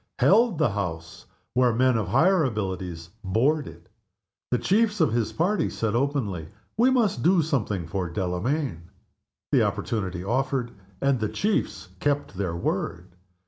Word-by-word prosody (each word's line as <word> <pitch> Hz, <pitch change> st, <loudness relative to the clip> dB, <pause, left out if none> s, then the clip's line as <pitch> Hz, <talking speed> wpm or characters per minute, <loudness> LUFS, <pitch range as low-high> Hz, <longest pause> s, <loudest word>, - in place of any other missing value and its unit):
Held 225 Hz, -2 st, +4 dB
the 150 Hz, -7 st, +2 dB
House, 80 Hz, -5 st, -5 dB, 0.3 s
where 125 Hz, 0 st, +4 dB
men 130 Hz, +1 st, +3 dB
of 110 Hz, -4 st, 0 dB
higher 160 Hz, -, +4 dB
abilities 95 Hz, -, -3 dB
"bored" 135 Hz, +10 st, +1 dB
it. -, -, -12 dB, 0.6 s
The 125 Hz, -, +2 dB
chiefs 210 Hz, -, +2 dB
of 155 Hz, -8 st, +3 dB
his 115 Hz, -2 st, 0 dB
party 190 Hz, +6 st, +1 dB
said 110 Hz, -2 st, -2 dB
openly, 120 Hz, -, -1 dB, 0.3 s
"We 240 Hz, +4 st, +4 dB
must 230 Hz, -, +2 dB
do 175 Hz, +2 st, +4 dB
something 110 Hz, -, -1 dB
for 90 Hz, +1 st, -3 dB
Delamayn," 90 Hz, -, -2 dB, 0.6 s
The -, -, +4 dB
opportunity 95 Hz, -5 st, -2 dB
offered, 130 Hz, +2 st, -1 dB, 0.3 s
and 135 Hz, -2 st, +2 dB
the 110 Hz, -1 st, -1 dB
chiefs 210 Hz, 0 st, -1 dB
kept 145 Hz, -4 st, 0 dB
their 90 Hz, -3 st, -2 dB
word. 85 Hz, +1 st, -3 dB
120 Hz, 140 wpm, -25 LUFS, 95-155 Hz, 0.6 s, Held